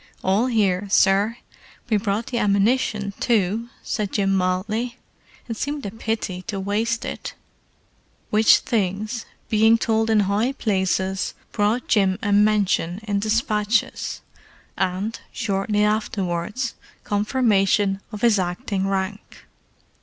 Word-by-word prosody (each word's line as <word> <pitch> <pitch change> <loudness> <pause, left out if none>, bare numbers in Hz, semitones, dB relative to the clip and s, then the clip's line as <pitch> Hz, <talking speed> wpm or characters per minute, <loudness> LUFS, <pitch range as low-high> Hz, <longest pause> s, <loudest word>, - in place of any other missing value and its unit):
"All 200 +6 +2
here, 205 -5 +1
sir. 200 +4 +3 0.5
We 220 -3 +2
brought 205 +2 -1
the 240 - -2
ammunition, 205 0 +1
too," 225 0 +1
said 210 -3 -2
Jim 195 -2 +1
mildly. 210 +6 -1 0.5
"It 230 -2 -4
seemed 285 +1 -3
a 200 - -4
pity 220 -4 -3
to 205 -4 -3
waste 220 +4 -1
it!" - - -6 1.0
Which 215 +1 +6
things, 215 +2 -2 0.2
being 220 +1 +4
told 225 0 +1
in 220 -1 +4
high 205 +6 +1
places, 190 -4 -1 0.2
brought 215 +3 0
Jim 195 -3 +3
a 205 -1 +1
mention 205 -4 +2
in 205 -2 -1
despatches, 215 0 0 0.5
and, 190 +5 -2
shortly 210 -1 0
afterwards, 210 +2 -1 0.3
confirmation 205 -2 +2
of 210 -2 -7
his 230 -4 +4
acting 190 +2 -2
rank. 195 +1 -4
210 Hz, 115 wpm, -23 LUFS, 195-225 Hz, 1.0 s, Which